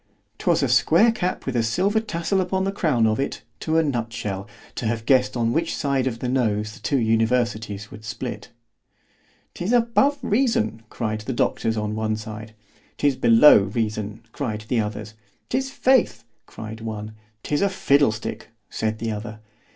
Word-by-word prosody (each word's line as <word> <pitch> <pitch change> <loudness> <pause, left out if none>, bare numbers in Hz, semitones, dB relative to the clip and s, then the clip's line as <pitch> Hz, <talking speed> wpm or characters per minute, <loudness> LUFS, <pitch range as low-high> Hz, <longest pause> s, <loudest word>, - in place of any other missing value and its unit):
'Twas - - +2
a - - +2
square 230 +1 +4
cap 185 -4 -3
with 130 - -3
a 120 - +3
silver 185 - +1
tassel 190 -2 -1
upon 190 +1 -1
the 195 - 0
crown 150 - +1
of 110 +1 +1
it—to 160 +3 -3
a 165 - +4
nut 120 -6 -2
shell—to 105 +2 -6
have 110 0 -2
guessed 130 -1 +3
on 115 0 +1
which 165 +1 -1
side 135 -2 0
of 120 -3 -2
the 125 - -4
nose 110 -4 0
the - - -13
two 140 - 0
universities 110 -3 0
would 110 - -11
split. 120 +3 -6 1.0
'Tis 180 +5 -3
above 245 +4 +3
reason, 205 - +1
cried 110 -2 -3
the 130 +5 -4
doctors 115 -1 0
on 105 0 -2
one 110 0 -1
side. 110 0 -8 0.4
'Tis 145 -2 +2
below 115 +2 +7
reason, 110 0 -3
cried 110 -6 -3
the 120 - +2
others. 105 0 -4 0.4
'Tis 265 +1 -1
faith, 260 - +2 0.2
cried 110 +1 -8
one. 110 -1 -5 0.3
'Tis 145 - -1
a 200 - +3
fiddle 140 - +3
stick, 110 0 -6 0.2
said 110 0 -2
the 115 0 -3
other. 110 0 -6
115 Hz, 165 wpm, -23 LUFS, 110-150 Hz, 1.0 s, below